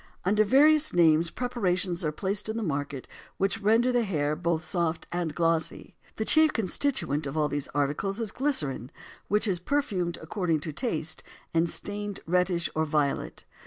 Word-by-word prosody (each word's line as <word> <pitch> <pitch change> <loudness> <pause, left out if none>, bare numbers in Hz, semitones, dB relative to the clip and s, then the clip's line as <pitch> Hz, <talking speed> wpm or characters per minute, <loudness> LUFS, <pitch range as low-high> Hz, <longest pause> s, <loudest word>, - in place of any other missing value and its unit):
Under 210 +3 +4
various 300 +7 +5
names 165 -1 +4
preparations 185 -8 -1
are 155 - 0
placed 200 +6 -1
on 220 - -2
the 230 - -2
market 145 -5 -3 0.3
which 195 +3 0
render 225 +5 +3
the 245 -1 +2
hair 150 -7 0
both 165 -1 -1
soft 170 -3 -1
and 170 -3 -2
glossy. 165 -1 0 0.2
The 220 - -2
chief 315 +3 +5
constituent 185 - 0
of 135 +3 -5
all 150 -1 +2
these 145 -1 -3
articles 145 +9 -1
is 225 -4 -2
glycerin 150 - -1 0.4
which 210 +2 +2
is 185 -3 +1
perfumed 185 -8 -1
according 165 -1 -1
to 155 -1 -5
taste 165 - -2 0.3
and 165 +1 +2
stained 205 +1 -5
reddish 180 0 +1
or 160 - +1
violet. 145 - -1
175 Hz, 160 wpm, -27 LUFS, 155-215 Hz, 0.4 s, various